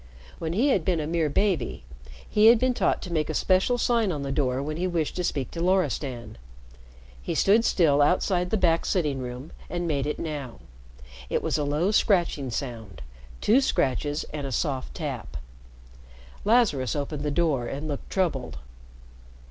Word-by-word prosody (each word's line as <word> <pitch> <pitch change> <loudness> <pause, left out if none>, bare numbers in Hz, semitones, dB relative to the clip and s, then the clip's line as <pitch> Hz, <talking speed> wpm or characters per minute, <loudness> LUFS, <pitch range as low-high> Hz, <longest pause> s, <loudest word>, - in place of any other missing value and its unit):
When 165 0 -3
he 245 +10 +2
had 195 - +2
been 175 -2 +1
a 150 - -2
mere 160 -1 0
baby, 165 - 0 0.4
he 210 +1 +4
had 230 +1 +8
been 255 +2 +1
taught - - 0
to 180 - -6
make 155 -2 0
a - - -2
special 190 +6 +2
sign 230 -4 +1
on 145 -4 -3
the 140 - -3
door 135 -2 0
when 155 +2 -4
he 180 +2 0
wished 165 -4 -1
to 180 - -1
speak 140 -6 -2
to 165 - -5
Loristan. 145 - -1 0.8
He 60 - -3
stood 215 +4 +4
still 150 -9 +3
outside 180 +3 +2
the 220 - +1
back 170 -4 +2
sitting 150 -7 0
room 125 +3 -7 0.2
and 175 -1 -3
made 145 -3 -1
it 150 - -2
now. 145 -7 -5 0.7
It - - -1
was - - 0
a - - 0
low 150 +7 +1
scratching 175 - +2
sound 115 - -6 0.4
two 240 +6 +4
scratches 145 - 0
and 145 -2 -4
a - - -6
soft 135 0 -2
tap. 135 - -5 1.1
Lazarus 205 - +2
opened 145 0 -3
the 150 - -1
door 145 -6 0
and 145 +5 -5
looked 145 -2 -5
troubled. 145 - -1
155 Hz, 175 wpm, -26 LUFS, 140-185 Hz, 1.1 s, had